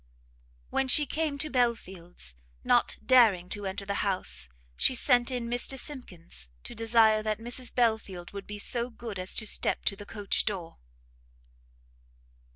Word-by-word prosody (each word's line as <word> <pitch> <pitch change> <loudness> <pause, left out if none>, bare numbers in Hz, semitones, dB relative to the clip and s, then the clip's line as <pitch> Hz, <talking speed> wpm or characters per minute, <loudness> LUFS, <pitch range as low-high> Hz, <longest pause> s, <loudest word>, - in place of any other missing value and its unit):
When 270 - +1
she 295 +3 +6
came 300 0 -2
to 305 +2 -2
Belfield's, 190 - -2 0.3
not - - +2
daring 215 -9 +5
to 205 -1 -3
enter 195 +1 -4
the 200 - -2
house, 185 - -2 0.3
she 260 - +3
sent 245 0 +4
in 245 -2 -3
Mr 245 +3 0
Simkins, 180 - -6
to - - -8
desire 225 -1 +4
that 215 -1 -1
Mrs 240 +2 -2
Belfield 220 -7 0
would 200 -1 -7
be 210 - -6
so 235 +3 0
good 225 -4 -7
as 185 +1 0
to 215 - -2
step - - +1
to 200 - +2
the 205 +1 -11
coach 205 -2 -1
door. 180 - -4
220 Hz, 155 wpm, -29 LUFS, 195-245 Hz, 0.3 s, she